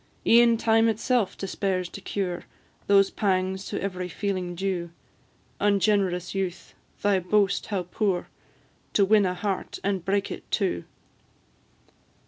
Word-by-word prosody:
E'en 235 0 +6
time 225 0 +3
itself 225 -1 0
despairs 190 -1 -2
to 200 - -10
cure 185 -3 -3 0.4
Those 195 -1 +5
pangs 190 -1 0
to - - -3
every 185 -2 -3
feeling 185 -2 -3
due: 180 -2 -2 0.7
Ungenerous 200 -3 +1
youth! 190 -2 -4 0.3
thy 200 -2 +3
boast 200 +2 +1
how 195 -4 -1
poor, 180 0 -1 0.7
To 200 - +4
win 205 -1 +4
a 180 - -2
heart, 195 0 -3
and 195 -3 -1
break 200 +1 0
it - - -8
too! 190 - 0
195 Hz, 125 wpm, -26 LUFS, 185-205 Hz, 0.7 s, E'en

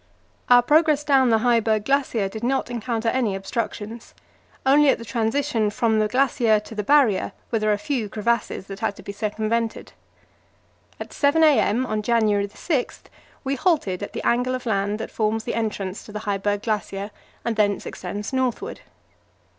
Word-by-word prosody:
Our 245 0 +7
progress 300 +1 +3
down 270 -4 +4
the 225 -1 +3
Heiberg 225 -3 +2
Glacier 265 -6 +1
did 220 +3 -8
not 260 0 0
encounter 230 -1 -1
any 230 -5 0
obstructions; 220 +2 -5 0.5
only 285 +2 +5
at - - +3
the 230 - -9
transition 225 +1 0
from 220 +1 +1
the 215 - +2
glacier 235 -3 +2
to 210 - -11
the 210 - -2
Barrier 265 -5 +3 0.2
were 225 - +1
there 215 0 +1
a 205 - +2
few 260 -6 -2
crevasses 225 -2 -1
that 195 0 -8
had 200 - -1
to 200 - -13
be 200 - -6
circumvented. 220 +2 -2 1.1
At - - -8
7 305 +3 +3
a.m. 260 -5 +3
on 215 -3 -2
January 210 -3 +2
6 270 - -2 0.4
we 270 0 -1
halted 275 - 0
at 205 - -6
the - - -5
angle 250 +2 +1
of 255 - -7
land 205 -2 0
that 225 - -6
forms 220 0 -1
the 235 - -3
entrance 210 -4 -3
to - - -11
the 210 0 -5
Heiberg 205 0 -1
Glacier, 205 -2 -3 0.3
and 235 -1 0
thence 205 -2 +1
extends 205 +6 -6
northward. 260 -2 -2
225 Hz, 170 wpm, -23 LUFS, 210-255 Hz, 1.1 s, Our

